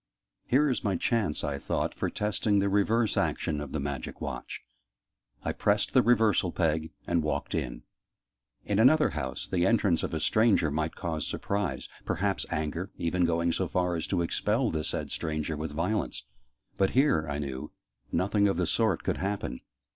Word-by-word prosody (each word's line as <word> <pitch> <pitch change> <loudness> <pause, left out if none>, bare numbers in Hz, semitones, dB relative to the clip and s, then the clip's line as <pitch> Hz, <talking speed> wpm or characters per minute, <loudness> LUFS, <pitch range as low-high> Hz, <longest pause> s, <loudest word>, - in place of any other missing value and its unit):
"Here 145 +4 +4
is 130 - -1
my 100 -3 +1
chance," 105 -4 0
I 70 -1 -2
thought, - - -1
"for - - -2
testing 105 0 0
the 100 0 +2
reverse 105 +3 +2
action 75 -2 0
of 75 -2 -6
the 80 - -2
Magic 70 -3 -4
Watch!" - - -5 0.8
I - - 0
pressed 105 0 +1
the 130 - +6
'reversal 110 -7 +3
peg' 80 -2 0
and 85 -1 +1
walked 75 - -2
in. - - -3 0.8
In 105 0 +1
another 150 +6 +5
house, 75 -4 -4
the 90 0 +1
entrance 100 -7 +3
of - - -3
a - - -1
stranger 105 -3 +3
might 80 +2 -1
cause 80 -3 -3
surprise 100 -9 -2 0.2
perhaps 95 +3 -1
anger, 80 +4 -2
even 90 +1 +1
going 85 0 +1
so 90 +2 0
far 90 +1 0
as 80 - -2
to 90 -3 +1
expel 110 +8 +1
the 80 -1 -2
said - - -2
stranger 80 0 -2
with 75 0 -4
violence: 85 - -1 0.5
but 95 -1 +3
here, 130 - +3
I 70 - -2
knew, 70 -3 -5 0.4
nothing 100 +2 +2
of 95 - 0
the 90 - +1
sort 110 +6 +1
could - - 0
happen. 95 -8 -3
90 Hz, 175 wpm, -29 LUFS, 80-105 Hz, 0.8 s, the